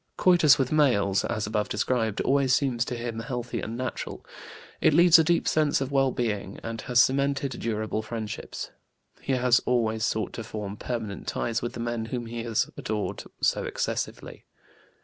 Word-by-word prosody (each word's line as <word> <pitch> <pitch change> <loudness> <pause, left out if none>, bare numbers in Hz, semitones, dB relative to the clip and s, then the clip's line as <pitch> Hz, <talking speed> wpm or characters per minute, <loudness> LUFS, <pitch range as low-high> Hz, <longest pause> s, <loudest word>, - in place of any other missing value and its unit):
Coitus 175 -5 +6
with 130 -2 0
males, 110 -11 +3
as 110 -3 -2
above 105 -1 -1
described, 110 -1 0
always 135 -2 +3
seems 130 -5 +1
to 125 - -4
him 115 -1 -4
healthy 120 0 -4
and 115 +2 -5
natural; 130 0 -5 0.6
it - - +4
leaves 170 -1 +8
a - - +5
deep 170 +2 +1
sense 155 -2 +2
of 135 0 -3
well 135 -1 +3
being, 105 -6 -3
and 115 -1 -5
has 125 -1 +2
cemented 140 +2 +2
durable 110 -1 -2
friendships. 110 -1 -6 0.5
He 135 - -1
has 125 -1 +3
always 110 -3 +1
sought 110 -3 -1
to 115 - -5
form 105 -2 -6
permanent 110 -4 -5
ties 115 0 -1
with 120 - -4
the - - -7
men 120 -1 -2
whom 120 +1 -4
he 115 0 -5
has 115 -2 +1
adored 105 -1 -3 0.2
so - - +2
excessively. - - -4
120 Hz, 170 wpm, -27 LUFS, 110-135 Hz, 0.6 s, leaves